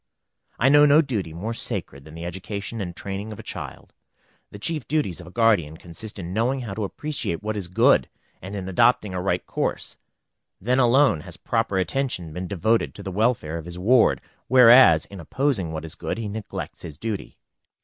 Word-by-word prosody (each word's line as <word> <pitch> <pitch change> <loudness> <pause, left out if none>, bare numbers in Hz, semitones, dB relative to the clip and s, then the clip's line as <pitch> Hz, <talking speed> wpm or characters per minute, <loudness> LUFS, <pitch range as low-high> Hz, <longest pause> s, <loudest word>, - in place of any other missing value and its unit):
I 130 - +4
know 145 +1 +7
no 150 +3 +6
duty 110 - -3
more 100 +8 -4
sacred 90 - -5
than 80 0 -12
the 85 +1 -7
education 100 +5 -5
and 90 -3 -5
training 100 +3 -5
of 105 - -8
a - - -9
child. - - -8 0.6
The - - -10
chief 150 +6 -3
duties 130 - -1
of 85 - -13
a - - -9
guardian 95 -8 +2
consist 85 +7 -9
in 90 -1 -6
knowing 125 +5 0
how 110 -5 -5
to 105 +1 -2
appreciate 135 - -4
what 110 0 -2
is 100 -4 -4
good, 90 - +3 0.3
and 95 +3 -7
in 95 -2 -5
adopting 100 +1 +2
a 90 - -2
right 95 - -1
course; - - -3 0.6
then 125 +6 +1
alone 125 - +4
has - - -10
proper 95 - -1
attention 95 - -2
been 90 +2 -5
devoted 110 +4 0
to 100 - -9
the 95 - -5
welfare 100 -6 0
of 80 - -9
his 85 0 -7
ward, 115 +6 +3 0.3
whereas 120 -10 +7
in 100 - -11
opposing 100 - -1
what 80 0 -5
is 80 - -8
good 80 - -4
he 115 -2 -4
neglects 105 +1 -6
his 75 -3 -8
duty. 110 +2 -5
100 Hz, 195 wpm, -24 LUFS, 85-120 Hz, 0.6 s, know